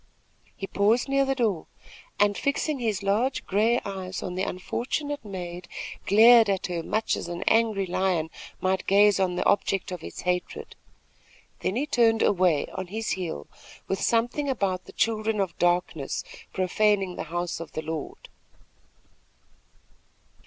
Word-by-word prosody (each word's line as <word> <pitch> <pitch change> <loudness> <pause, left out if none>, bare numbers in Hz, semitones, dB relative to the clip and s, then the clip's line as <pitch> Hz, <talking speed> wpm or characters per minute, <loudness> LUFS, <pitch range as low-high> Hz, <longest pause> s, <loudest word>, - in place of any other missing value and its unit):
He 195 - -5
paused 210 +6 +2
near 275 0 +2
the 270 0 0
door 215 -10 0 0.5
and, 205 0 +4
fixing 280 +3 -1
his 215 -5 -1
large 220 +7 0
gray 220 +5 +2
eyes 190 -2 -5
on 180 - -4
the 185 - -2
unfortunate 255 +10 -3
maid, 180 -3 -7 0.4
glared 225 +2 +7
at 195 -2 0
her 175 -2 -2
much 215 +6 0
as - - -5
an 175 +1 -4
angry 220 -3 +2
lion 180 -3 0 0.3
might 190 0 0
gaze 205 +1 +5
on 185 -2 +1
the 180 - -1
object 195 -1 +1
of 180 -3 -6
its - - -7
hatred; 180 0 -3 0.8
then 190 - -1
he 270 +5 0
turned 230 -5 +3
away 180 -6 +3
on 185 -1 -5
his 220 +4 -3
heel 170 - -3 0.4
with 195 - -2
something 240 +5 +1
about 195 -7 -1
the - - -12
children 220 -1 0
of 190 -4 -1
darkness 175 -5 0 0.3
profaning 195 0 +1
the - - -5
house 175 0 -2
of 165 - -8
the 155 - -4
Lord. 160 -2 -6
195 Hz, 150 wpm, -26 LUFS, 180-225 Hz, 0.8 s, glared